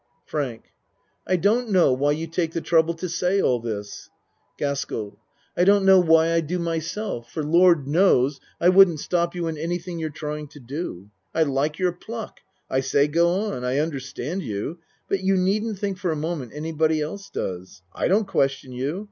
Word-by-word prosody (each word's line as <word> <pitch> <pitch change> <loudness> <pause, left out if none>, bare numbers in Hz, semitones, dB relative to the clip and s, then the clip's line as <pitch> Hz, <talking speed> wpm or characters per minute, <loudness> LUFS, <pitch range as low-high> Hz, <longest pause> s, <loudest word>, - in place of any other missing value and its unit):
FRANK 135 -7 -3 0.6
I 185 - +3
don't 220 +7 +2
know 180 -9 +4
why 145 +3 +2
you 160 +2 -3
take 165 0 -2
the - - -1
trouble 165 0 +2
to 180 +2 -4
say 180 +3 0
all 125 -9 +2
this. 105 -3 -6 0.5
GASKELL 110 -7 -3 0.4
I - - +3
don't 200 +1 +4
know 190 -1 +7
why 165 -1 +4
I 165 - +3
do 165 +3 -3
myself, 165 - -3
for 155 - -3
Lord 170 -2 +4
knows, 145 -4 +3 0.2
I 175 - +5
wouldn't 185 -4 +6
stop 170 +2 -1
you 175 -1 -2
in 160 -2 -3
anything 175 +1 -3
you're 160 -1 -2
trying 150 0 -5
to 145 - -14
do. 120 - -6 0.2
I 160 - +4
like 145 +1 -1
your 185 -1 +1
pluck. 220 +5 -8 0.3
I 130 - 0
say 140 +2 +2
go 170 +3 +3 0.2
on. 125 - -5
I 125 +2 0
un 160 +2 0
derstand 140 +5 -5
you 115 - -4 0.3
but 195 - 0
you 190 0 +2
needn't 205 +3 0
think 195 -1 -3
for 180 -3 -1
a - - -1
mo 160 +3 -2
ment 130 -7 -7
anybody 155 0 0
else 195 +6 -5
does. 95 0 -6
I - - 0
don't 205 +4 +3
question 135 -7 0
you. 135 +8 -3
160 Hz, 190 wpm, -24 LUFS, 140-180 Hz, 0.6 s, know